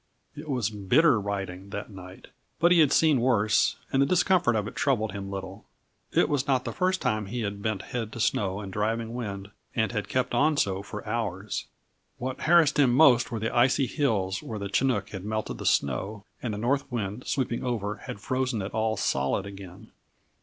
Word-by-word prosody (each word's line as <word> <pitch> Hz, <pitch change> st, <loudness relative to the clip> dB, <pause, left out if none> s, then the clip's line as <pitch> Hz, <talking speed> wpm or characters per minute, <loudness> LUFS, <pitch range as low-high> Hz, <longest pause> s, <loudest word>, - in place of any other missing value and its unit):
It 150 Hz, +1 st, -9 dB
was 125 Hz, -6 st, 0 dB
bitter 110 Hz, -, +3 dB
riding, 100 Hz, -1 st, -4 dB
that 100 Hz, +2 st, -6 dB
night, 95 Hz, -1 st, -11 dB, 0.3 s
but 170 Hz, +2 st, +4 dB
he 175 Hz, -, +6 dB
had 150 Hz, -4 st, +5 dB
seen 150 Hz, -6 st, +4 dB
worse 110 Hz, -4 st, +3 dB, 0.2 s
and 135 Hz, -, +4 dB
the 140 Hz, -, +4 dB
discomfort 180 Hz, -6 st, +3 dB
of 105 Hz, -1 st, -1 dB
it -, -, -8 dB
troubled 110 Hz, -1 st, +1 dB
him 100 Hz, 0 st, -6 dB
little; 95 Hz, -1 st, -7 dB, 0.5 s
it -, -, +3 dB
was 140 Hz, -2 st, 0 dB
not 130 Hz, -2 st, +1 dB
the -, -, -2 dB
first 185 Hz, 0 st, 0 dB
time 110 Hz, -1 st, 0 dB
he 120 Hz, +4 st, -3 dB
had 100 Hz, -1 st, -4 dB
bent 110 Hz, -2 st, -2 dB
head 115 Hz, -3 st, -4 dB
to -, -, -7 dB
snow 100 Hz, -2 st, 0 dB
and 95 Hz, -2 st, -7 dB
driving 115 Hz, +2 st, -1 dB
wind 100 Hz, -5 st, -5 dB, 0.2 s
and 110 Hz, -1 st, +1 dB
had 105 Hz, -3 st, -3 dB
kept 130 Hz, -1 st, 0 dB
on 150 Hz, +5 st, +3 dB
so 95 Hz, -6 st, +1 dB
for 105 Hz, +1 st, -8 dB
hours. 105 Hz, -3 st, -3 dB, 0.5 s
What 130 Hz, +1 st, -4 dB
harassed 160 Hz, -3 st, +4 dB
him 135 Hz, -4 st, +5 dB
most 135 Hz, -3 st, +5 dB
were 115 Hz, -, -2 dB
the 110 Hz, +1 st, -2 dB
icy 130 Hz, +3 st, +4 dB
hills 110 Hz, -9 st, 0 dB
where 110 Hz, -, -6 dB
the 100 Hz, -1 st, -4 dB
chinook 105 Hz, -2 st, +1 dB
had 95 Hz, -3 st, -7 dB
melted 110 Hz, +1 st, -3 dB
the -, -, -2 dB
snow, 100 Hz, -, 0 dB, 0.2 s
and 110 Hz, -4 st, -3 dB
the -, -, -5 dB
north 135 Hz, +6 st, 0 dB
wind, 110 Hz, 0 st, -4 dB
sweeping 125 Hz, -4 st, -1 dB
over, 110 Hz, -4 st, -2 dB
had 100 Hz, -, -8 dB
frozen 130 Hz, -2 st, -1 dB
it 95 Hz, -, -5 dB
all 110 Hz, 0 st, 0 dB
solid 70 Hz, +3 st, 0 dB
again. 100 Hz, +1 st, -11 dB
110 Hz, 200 wpm, -27 LUFS, 100-130 Hz, 0.5 s, he